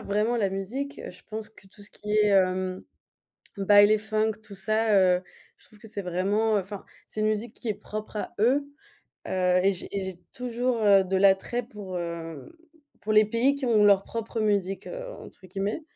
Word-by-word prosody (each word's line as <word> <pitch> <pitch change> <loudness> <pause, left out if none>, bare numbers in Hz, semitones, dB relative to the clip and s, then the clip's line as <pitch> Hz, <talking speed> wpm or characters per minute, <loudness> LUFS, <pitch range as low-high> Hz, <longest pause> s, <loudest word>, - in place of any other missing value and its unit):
vraiment 210 +4 0
la 205 -4 +1
musique, 225 +9 -4
heu, - - -6
je - - -15
pense 220 0 -5
que 210 -3 -20
tout 205 +2 -17
ce 205 - -12
qui 210 0 -6
est, 210 0 +4
hem, 185 -1 +1 0.7
Baile 205 +2 +6
Funk 215 +1 0
tout 210 -2 -12
ça, 215 +3 +1
heu, 180 -2 +4 0.4
je - - -24
trouve 215 - -20
que 225 - -13
c'est 205 - -4
vraiment, 200 +5 +1
heu - - +1
enfin 195 +1 -9 0.2
c'est - - -7
une 215 - +2
musique 215 +2 -2
qui 235 - -9
est 215 - +1
propre 215 +2 -8
à 210 - -4
eux, 260 +6 +3 0.6
heu 180 -1 +2
et 195 - +4
j'ai 180 - -4
et 195 - -2
j'ai 185 -2 -7
toujours, 245 -1 -2
heu, 200 -2 +6
de 190 +1 -1
l'attrait 195 +5 +3
pour, 205 -5 -8
hem, 165 - -6 0.5
pour 215 - -2
les 215 0 +6
pays 230 +6 +2
qui 280 -1 -5
ont 220 -4 +4
leur 200 -1 +6
«propre 230 0 -4
musique», 200 -3 0
heu, - - -6
entre 185 - -13
guillemets 200 - -3
210 Hz, 205 wpm, -26 LUFS, 190-220 Hz, 0.7 s, Baile